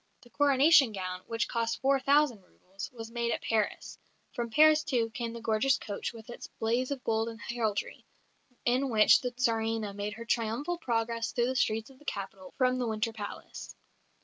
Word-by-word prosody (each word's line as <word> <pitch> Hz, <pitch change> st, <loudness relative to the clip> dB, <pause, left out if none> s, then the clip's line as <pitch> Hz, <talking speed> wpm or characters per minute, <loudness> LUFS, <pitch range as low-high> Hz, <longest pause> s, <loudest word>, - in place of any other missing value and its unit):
The 240 Hz, -, -19 dB
Coronation 285 Hz, -2 st, +5 dB
gown, 185 Hz, -2 st, -4 dB
which 230 Hz, 0 st, -1 dB
cost 230 Hz, -1 st, -1 dB
four 275 Hz, 0 st, +3 dB
thousand 275 Hz, -5 st, +3 dB
roubles, 190 Hz, +1 st, -10 dB
was 225 Hz, -2 st, -9 dB
made 235 Hz, 0 st, -1 dB
at -, -, -2 dB
Paris; 220 Hz, -2 st, -1 dB, 0.3 s
and -, -, -27 dB
from 240 Hz, -3 st, -2 dB
Paris, 310 Hz, +4 st, +5 dB
too, 235 Hz, -6 st, 0 dB
came 235 Hz, 0 st, -4 dB
the 235 Hz, -, -7 dB
gorgeous 235 Hz, +5 st, +2 dB
coach 205 Hz, -2 st, -5 dB
with 225 Hz, -2 st, -12 dB
its -, -, -9 dB
blaze 235 Hz, +3 st, 0 dB
of 275 Hz, -3 st, -4 dB
gold 225 Hz, 0 st, 0 dB
and 225 Hz, 0 st, -9 dB
heraldry, 220 Hz, -2 st, -3 dB, 0.6 s
in 255 Hz, +3 st, +2 dB
which 215 Hz, -3 st, +6 dB
the 250 Hz, -, -1 dB
Tsarina 225 Hz, -4 st, -1 dB
made 205 Hz, +1 st, -4 dB
her 230 Hz, -, -8 dB
triumphal 235 Hz, +10 st, -1 dB
progress 230 Hz, -2 st, -1 dB
through 240 Hz, -, +2 dB
the 260 Hz, -, -2 dB
streets 220 Hz, 0 st, 0 dB
of 260 Hz, -, -19 dB
the 295 Hz, -, -19 dB
capital 195 Hz, -4 st, -6 dB
from 255 Hz, -1 st, +2 dB
the 245 Hz, -, -1 dB
Winter 220 Hz, +1 st, -1 dB
Palace. 205 Hz, -2 st, -8 dB
230 Hz, 190 wpm, -30 LUFS, 220-255 Hz, 0.6 s, which